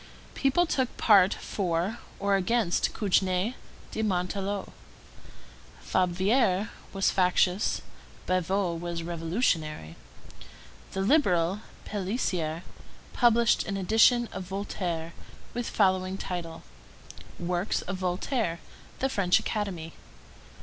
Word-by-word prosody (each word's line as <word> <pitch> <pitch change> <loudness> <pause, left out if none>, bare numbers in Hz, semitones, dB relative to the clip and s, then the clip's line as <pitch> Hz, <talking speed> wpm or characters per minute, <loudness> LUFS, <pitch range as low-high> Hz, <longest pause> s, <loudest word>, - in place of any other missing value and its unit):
People 275 +6 +2
took 260 -6 -1
part 195 -4 +6
for 185 +3 -2 0.2
or 200 0 +2
against 195 -1 +1
Cugnet 190 +1 +1 0.4
de - - -2
Montarlot. 195 0 -2 1.1
Fabvier 190 +3 +1 0.2
was 195 -1 +1
factious; 180 +1 +2 0.4
Bavoux 185 0 0
was 170 -1 -4
revolutionary. 165 - -1 1.0
The 190 - -1
Liberal, 195 - +3 0.3
Pélicier, 185 -5 -2 0.5
published 235 -1 +3
an 195 - -2
edition 225 +5 +4
of 185 - -5
Voltaire, 180 -4 -4 0.4
with 240 0 -3
the - - -5
following 185 -1 +2
title: 170 -4 -5 0.8
Works 175 +3 -1
of 190 0 -4
Voltaire, 185 +3 -1
of 170 - -18
the 265 - +3
French 200 -9 +3
Academy. 180 -6 -3
190 Hz, 100 wpm, -28 LUFS, 175-210 Hz, 1.1 s, part